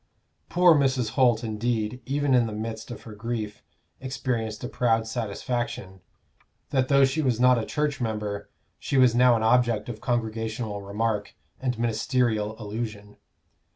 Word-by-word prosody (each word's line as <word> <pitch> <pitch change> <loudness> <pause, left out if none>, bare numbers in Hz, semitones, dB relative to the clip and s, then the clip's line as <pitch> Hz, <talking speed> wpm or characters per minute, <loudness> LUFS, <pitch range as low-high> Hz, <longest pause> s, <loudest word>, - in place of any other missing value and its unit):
Poor 175 -1 +6
Mrs. 130 -5 +2
Holt, 120 -2 +3
indeed, 115 +1 -2
even 140 0 +1
in 120 -2 +4
the 110 - -5
midst 110 +2 -5
of 120 - -8
her 110 - -9
grief, 110 -1 -4 0.4
experienced 120 -4 -3
a - - -2
proud 115 -3 +1
satisfaction; 110 -3 -4 0.7
that 130 -1 +2
though 140 0 +5
she 135 +4 0
was 125 -6 +1
not 125 -1 +5
a 110 - -3
church 150 -2 -1
member 105 -3 -3 0.3
she 140 - -1
was 130 -3 +6
now 125 0 +5
an 110 - 0
object 115 -2 +2
of 110 -2 -6
congregational 110 -3 -2
remark 105 +1 -2 0.2
and 125 -2 -1
ministerial 110 -1 0
allusion. 105 -1 -6
115 Hz, 150 wpm, -26 LUFS, 110-125 Hz, 0.7 s, Poor